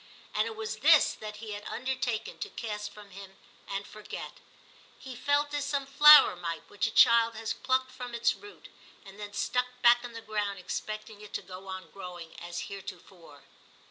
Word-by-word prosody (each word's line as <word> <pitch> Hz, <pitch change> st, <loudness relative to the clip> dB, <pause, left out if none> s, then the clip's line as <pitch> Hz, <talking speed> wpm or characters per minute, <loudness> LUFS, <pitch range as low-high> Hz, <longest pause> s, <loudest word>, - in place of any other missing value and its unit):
And 215 Hz, +1 st, +1 dB
it 225 Hz, -, -6 dB
was 220 Hz, 0 st, -4 dB
this 305 Hz, +5 st, +6 dB
that 210 Hz, -1 st, -8 dB
he 215 Hz, 0 st, -8 dB
had 205 Hz, 0 st, -5 dB
undertaken 255 Hz, -3 st, -3 dB
to -, -, -4 dB
cast 210 Hz, -2 st, -5 dB
from 205 Hz, -1 st, -14 dB
him 195 Hz, 0 st, -11 dB, 0.3 s
and 200 Hz, +1 st, -4 dB
forget. 215 Hz, 0 st, -9 dB, 0.6 s
He 260 Hz, -2 st, -9 dB
felt 285 Hz, +3 st, +1 dB
as 290 Hz, -1 st, -1 dB
some 280 Hz, -1 st, -1 dB
flower 295 Hz, -3 st, +8 dB
might 170 Hz, -2 st, -5 dB
which 205 Hz, +2 st, 0 dB
a -, -, -1 dB
child 230 Hz, 0 st, +6 dB
had 220 Hz, 0 st, -3 dB
plucked 260 Hz, 0 st, +1 dB
from 245 Hz, -2 st, -7 dB
its 235 Hz, -, +2 dB
root, 415 Hz, 0 st, -14 dB, 0.4 s
and 195 Hz, +1 st, -13 dB
then 205 Hz, -1 st, -7 dB
stuck 250 Hz, +3 st, 0 dB, 0.2 s
back 240 Hz, 0 st, +6 dB
in 240 Hz, -1 st, -8 dB
the 230 Hz, -, -7 dB
ground 210 Hz, -2 st, -2 dB
expecting 215 Hz, +3 st, -6 dB
it 210 Hz, -, -12 dB
to -, -, -3 dB
go 185 Hz, +1 st, -10 dB
on 185 Hz, -3 st, -7 dB
growing 175 Hz, -4 st, -9 dB
as 175 Hz, 0 st, -5 dB
heretofore. 180 Hz, -6 st, -10 dB
215 Hz, 185 wpm, -29 LUFS, 195-250 Hz, 0.6 s, flower